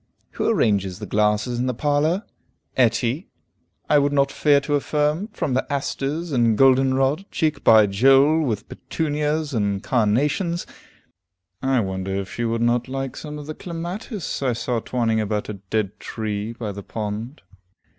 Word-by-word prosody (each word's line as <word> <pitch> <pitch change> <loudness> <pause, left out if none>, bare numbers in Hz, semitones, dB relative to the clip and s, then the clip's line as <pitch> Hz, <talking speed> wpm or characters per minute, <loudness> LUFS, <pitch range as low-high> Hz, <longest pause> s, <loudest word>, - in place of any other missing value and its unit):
Who - - -1
arranges 100 -4 +1
the 105 - -6
glasses 105 +4 +1
in 125 - 0
the 125 - -1
parlor? 150 - +1 0.5
Etty, 120 - +1 0.6
I 150 - +5
would 140 0 +1
not 140 -1 +2
fear 145 -2 +4
to 145 +1 -3
affirm, 150 +5 0
from 210 - -3
the 130 - -1
asters 145 +4 -2
and 115 -5 +2
golden 135 +1 +5
rod, 135 +9 0
cheek 155 -1 -1
by 110 -1 +7
jole 135 +10 +4
with 115 -9 -2
petunias 150 -1 -2
and 100 -3 0
carnations. 145 - +1 1.0
I 135 -2 +2
wonder 95 -1 -3
if 100 -1 -4
she 120 - -2
would 115 0 0
not 120 +1 +1
like 135 0 -4
some 150 -1 -7
of 150 - -8
the 155 - -5
clematis 175 - -5
I 130 -3 +1
saw 120 +1 -1
twining 115 -2 0
about 105 0 -2
a 105 -2 -6
dead 105 -2 -1
tree 110 0 -4
by 115 -3 -5
the 100 0 -7
pond. 110 +6 -5
130 Hz, 160 wpm, -23 LUFS, 110-150 Hz, 1.0 s, by